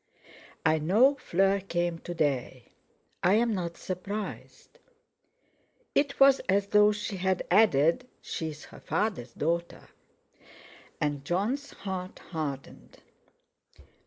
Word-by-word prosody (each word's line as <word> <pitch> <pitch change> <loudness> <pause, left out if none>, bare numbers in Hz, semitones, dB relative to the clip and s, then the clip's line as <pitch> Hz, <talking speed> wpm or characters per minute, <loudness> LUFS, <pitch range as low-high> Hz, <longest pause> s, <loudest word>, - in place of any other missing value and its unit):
"I 160 0 +4
know 215 - +4
Fleur 195 -6 +1
came 175 -3 -2
to 175 - -7
day. 135 -5 -2 0.5
I'm 220 +5 +3
not 170 -3 -3
surprised." 200 - -6 1.1
It 280 -1 +1
was 275 0 +7
as 200 +1 +2
though 210 0 +6
she 205 -1 -4
had 185 0 0
added: 185 - +4
"She 160 - -4
is 155 0 -10
her - - -14
father's 195 - -2
daughter!" 170 +3 -2 1.1
And 145 -2 -1
Jon's 210 - -1
heart 185 -2 -6
hardened. 145 -5 -6
185 Hz, 105 wpm, -28 LUFS, 160-210 Hz, 1.1 s, was